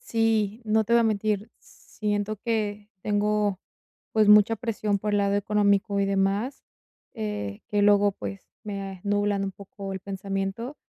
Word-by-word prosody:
Sí, 225 - 0
no 220 0 +2
te 230 - -2
voy 235 - +6
a - - +4
mentir, 215 -1 0
siento 210 0 -4
que 210 -2 -2
tengo, 210 -1 +1 0.5
pues, 215 -2 +4
mucha 210 +2 +7
presión 215 -3 -1
por 210 +1 -2
el 205 - +3
lado 200 0 +2
económico 205 0 +2
y - - +3
demás, 195 +6 0 0.5
eh, 210 - -4
que 205 -1 +1
luego, 205 0 +5
pues, 195 0 -7 0.2
me 195 -2 -5
nublan 205 -1 +1
un 195 - -3
poco 195 0 -8
el 190 - -5
pensamiento. 195 +6 -4
205 Hz, 155 wpm, -26 LUFS, 200-215 Hz, 0.5 s, mucha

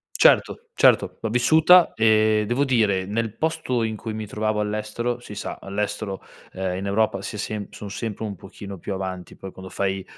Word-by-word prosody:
Certo, 470 -2 +3
certo, - - +4
l'ho 110 - -2
vissuta 160 +9 +6
e 110 -1 +4
devo 125 +5 +1
dire 105 -8 +2
nel 110 +1 -2
posto 160 -7 -1
in 110 -1 -2
cui 110 +1 -6
mi 110 0 -4
trovavo 105 +1 -1
all'estero, 110 +3 -2
si 105 -4 -10
sa, - - -5
all'estero, 100 -1 -3 0.3
ehm, 95 -1 -2
in 100 - -4
Europa 100 -1 +1
si 105 - -6
è - - -5
sem 105 0 -4
son 100 -1 -9
sempre 110 +1 -4
un 100 -2 -5
pochino 100 +1 -10
più 100 - -4
avanti. 95 -1 -6
Poi 95 - -9
quando 95 0 -10
fai 95 0 -2
105 Hz, 190 wpm, -24 LUFS, 100-115 Hz, 0.3 s, vissuta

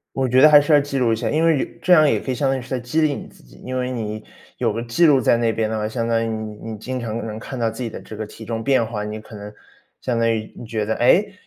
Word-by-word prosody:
我 135 -1 0
觉 125 +1 +4
得 155 - +9
还 145 -1 +9
是 150 +2 +1
要 145 - +7
记 140 -1 -3
录 120 -3 +2
一 - - +2
下， 110 - -2
因 160 +2 +1
为 160 -4 +3
以 - - -5
这 180 - +4
样 155 -4 +6
也 - - +1
可 130 - -4
以 125 - -2
相 135 +1 0
当 135 - +1
于 130 - -5
是 125 - -13
在 130 - -1
激 120 +7 -1
励 155 -2 +2
你 - - -7
自 - - -20
己。 - - -18
因 130 0 -4
为 125 0 -2
你 110 -3 -4 0.3
有 - - 0
个 115 - -3
记 120 +9 +2
录 140 -4 +5
在 120 - +3
那 115 -1 +1
边 110 -1 -1
的 110 - -2
话， 105 0 -2
相 115 +1 -3
当 115 0 +1
于 - - -2
你 110 -1 -5 0.2
你 110 - -6
经 130 +4 -5
常 115 -1 -4
能 110 0 -6
看 125 +2 -7
到 115 - +1
自 115 +3 -6
己 115 - -3
的 - - -8
这 110 - -10
个 110 - -4
体 110 +2 -12
重 115 0 -4
变 130 -3 +2
化， 110 -2 -4
你 105 +1 -5
可 110 0 -13
能 105 0 -9 0.5
相 125 -2 -1
当 115 0 +2
于 110 -1 -3
你 - - -8
觉 110 -2 -2
得， 110 - 0
诶？ 200 +12 +3
115 Hz, 360 characters per minute, -21 LUFS, 110-135 Hz, 0.5 s, 得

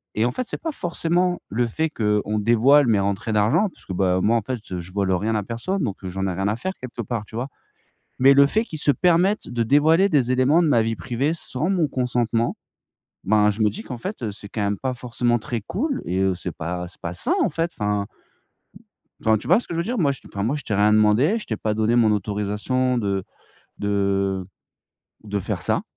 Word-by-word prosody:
et 110 - +2
en 120 - +1
fait, 250 - -4
c'est - - -5
pas 325 - -2
forcément 175 - 0
le 120 +4 0
fait 160 +8 -1
qu'on 105 -4 0
dévoile 120 +6 +5
mes 110 -3 +3
rentrées 100 +2 -1
d'argent 105 - +3
parce - - -19
que, 95 - -5
bah, 90 0 +1
moi, 115 +4 +3
en - - 0
fait, 125 +5 -3
heu, 90 - -3
je 85 +1 -9
vole 100 -1 0
rien 105 +5 0
à 105 - 0
personne, 135 - -3
donc 100 -7 -2
j'en 95 +1 -3
ai 95 - -1
rien 95 +3 -1
à 105 - +1
faire 190 +11 -4
quelque 125 -1 -6
part, 115 -1 -4
tu 110 - -13
vois, 120 +3 -2 0.7
mais 135 +2 +7
le 140 0 +7
fait 220 +9 +1
qu'il 160 -8 -7
se 145 - +4
permette 180 - +2
de 120 -1 0
dévoiler 155 - +4
des 135 -7 +2
éléments 130 +6 +4
de - - +2
ma 120 -6 +4
vie 115 0 -1
privée, 120 - -1
sans 155 0 -3
mon 175 -5 +2
consentement, 120 -3 0 0.7
ben, 105 +1 +4
je 105 +2 -5
me 105 - +4
dis: 215 - -7
«Qu'en 125 - -6
fait, 190 - -6
eu, 110 -3 -2
c'est 100 0 -10
quand 110 - -5
même 100 0 -1
pas 130 -1 -2
forcément 120 -1 0
très 115 +1 -4
cool 255 - -2
et 90 - -2
heu, 95 -1 +2
c'est 90 0 -5
pas 90 +2 -4
c'est 90 - -17
pas 85 -1 -5
sain» 90 - 0
en - - +2
fait, 165 +2 -1
enfin. 105 -1 0 1.2
Enfin, 110 0 +3
tu - - -9
vois 180 +6 +5
ce - - -8
que - - -5
je 165 - -1
veux - - 0
dire? 240 +7 -3
Moi 145 -5 +3
je - - -12
t'ai - - -15
enfin 100 - -3
moi 120 +7 0
je 150 - -5
t'ai - - -3
rien 105 +1 +4
demandé. 110 - +4
Je - - -9
t'ai 110 - -3
pas 110 0 -1
donné 110 +2 +1
mon 110 -3 +4
autorisation 105 +5 -1
de 100 -4 -1 0.6
de 100 -2 0 0.8
de 105 -1 -2
faire - - -3
ça, - - 0
115 Hz, 240 wpm, -23 LUFS, 100-145 Hz, 1.2 s, mais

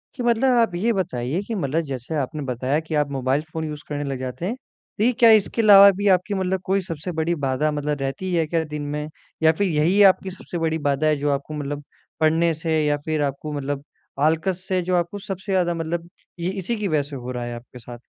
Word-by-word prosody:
कि 250 - -4
मतलब 235 0 +2
आप 230 -6 +2
ये 225 +7 +1
बताइए 155 - -2
कि 230 - -3
मतलब 160 -3 0
जैसे 130 +4 -4
आपने 150 +3 -3
बताया 130 +3 -1
कि 160 0 -5
आप 150 -1 +1
मोबाइल 135 +1 0
फ़ोन 160 0 -3
यूज़ 150 -1 -6
करने 145 -1 -2
लग 135 -2 -4
जाते 130 +6 -5
हैं। 220 +6 -2
तो 250 -2 -3
क्या 235 - +8
इसके 220 +1 +3
अलावा 200 -2 +9
भी 205 +1 0
आपकी 185 +3 -4
मतलब 190 -1 -1
कोई 195 +1 +1
सबसे 170 -1 -5
बड़ी 165 +1 0
बाधा 135 +3 +1
मतलब 150 0 -2
रहती 135 +8 -3
है 165 -2 +2
क्या 165 +1 0
दिन 150 -1 -6
में? 150 +1 -4 0.4
या 160 - +7
फिर 195 +5 0
यही 170 +5 +3
आपकी 190 +1 -8
सबसे 180 -1 -7
बड़ी 160 -1 0
बाधा 140 +2 +1
है 155 - +3
जो 145 +1 -1
आपको 140 +2 -3
मतलब 145 0 -4 0.4
पढ़ने 165 +1 +3
से 160 0 -1
या 145 0 +2
फिर 155 -1 0
आपको 145 +2 -3
मतलब 140 -1 -3 0.4
आल्कस 165 +5 +1
से 185 -1 +1
जो 180 +1 0
आपको 175 +3 -1
सबसे 195 -1 -6
ज़्यादा 180 -2 +2
मतलब 165 +1 -4 0.3
ये 170 +1 -1
इसी 195 +5 -3
की 210 -2 -2
वज़ह 155 -5 +1
से 145 - -7
हो 125 -1 -6
रहा 125 -1 -4
है 120 - -5
आपके 125 +1 -11
साथ? 120 +1 -10
160 Hz, 230 wpm, -23 LUFS, 145-185 Hz, 0.4 s, अलावा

